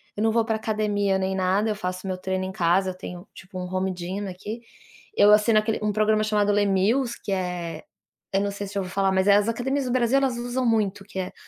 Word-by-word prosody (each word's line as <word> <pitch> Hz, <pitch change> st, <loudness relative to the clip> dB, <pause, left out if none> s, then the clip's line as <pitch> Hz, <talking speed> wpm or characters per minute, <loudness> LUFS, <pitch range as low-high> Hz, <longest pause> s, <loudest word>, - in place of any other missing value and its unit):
eu 205 Hz, -, -3 dB
não 225 Hz, -, +3 dB
vou 230 Hz, 0 st, +2 dB
pra 225 Hz, -1 st, 0 dB
academia 210 Hz, -3 st, 0 dB
nem 190 Hz, 0 st, -1 dB
nada, 190 Hz, +3 st, +1 dB
eu 210 Hz, -, 0 dB
faço 185 Hz, -1 st, -5 dB
meu 185 Hz, -, -1 dB
treino 185 Hz, 0 st, -2 dB
em 190 Hz, -, -4 dB
casa, 185 Hz, +1 st, +2 dB
eu 185 Hz, -, -12 dB
tenho 180 Hz, 0 st, -8 dB
tipo 185 Hz, 0 st, -11 dB
um 180 Hz, -, -4 dB
home 185 Hz, 0 st, 0 dB
gym 185 Hz, +3 st, -5 dB
aqui, 205 Hz, +5 st, -7 dB, 0.6 s
eu 205 Hz, -, +7 dB
assino 215 Hz, +1 st, +4 dB
aquele 215 Hz, +1 st, -1 dB
um 210 Hz, -, +1 dB
programa 215 Hz, +1 st, +2 dB
chamado 210 Hz, -1 st, +2 dB
Les 205 Hz, 0 st, +2 dB
Mills 230 Hz, +6 st, +1 dB
que -, -, -4 dB
é, 180 Hz, -4 st, -3 dB, 0.5 s
eu 195 Hz, -, +2 dB
não 200 Hz, 0 st, -1 dB
sei 200 Hz, 0 st, -6 dB
se 200 Hz, -, -10 dB
já 200 Hz, -, 0 dB
ouviu 185 Hz, -1 st, -7 dB
falar, 195 Hz, -1 st, +2 dB
mas 190 Hz, +1 st, +1 dB
as 205 Hz, +2 st, +5 dB
academias 265 Hz, +4 st, -1 dB
do 250 Hz, -, -2 dB
Brasil 250 Hz, +1 st, +2 dB
elas 265 Hz, -3 st, 0 dB
usam 245 Hz, +2 st, -2 dB
muito 210 Hz, -4 st, +1 dB
que 200 Hz, -, -11 dB
é, 185 Hz, -, -4 dB
200 Hz, 245 wpm, -25 LUFS, 190-220 Hz, 0.6 s, eu